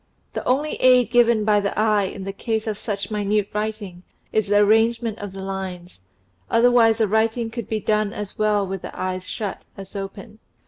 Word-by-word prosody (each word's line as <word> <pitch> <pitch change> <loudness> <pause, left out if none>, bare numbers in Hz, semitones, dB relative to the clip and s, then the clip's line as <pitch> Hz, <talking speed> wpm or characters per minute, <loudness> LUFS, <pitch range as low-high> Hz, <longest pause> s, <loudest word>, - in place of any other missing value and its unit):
The - - -4
only 285 +5 +1
aid 250 -3 +4
given 235 -3 +4
by 210 -1 +4
the 200 -1 -3
eye 210 -2 +3
in 190 +1 -6
the 195 +1 -5
case 220 +1 -2
of 215 -2 -2
such 200 -2 -4
minute 210 -1 0
writing 210 -4 -4 0.3
is 215 -2 +1
the 205 +1 +3
arrangement 225 +2 +3
of 205 -1 -6
the 190 0 -8
lines, 185 - -6 0.5
otherwise 230 -1 +4
the 220 -2 +2
writing 225 +2 0
could 235 -2 -6
be 220 - -1
done 215 0 0
as 205 -1 -6
well 210 -1 +1
with 190 -1 -5
the - - -9
eyes 185 0 -3
shut 205 -3 -4 0.2
as 195 +1 -10
open. 195 +2 -7
210 Hz, 190 wpm, -22 LUFS, 195-225 Hz, 0.5 s, aid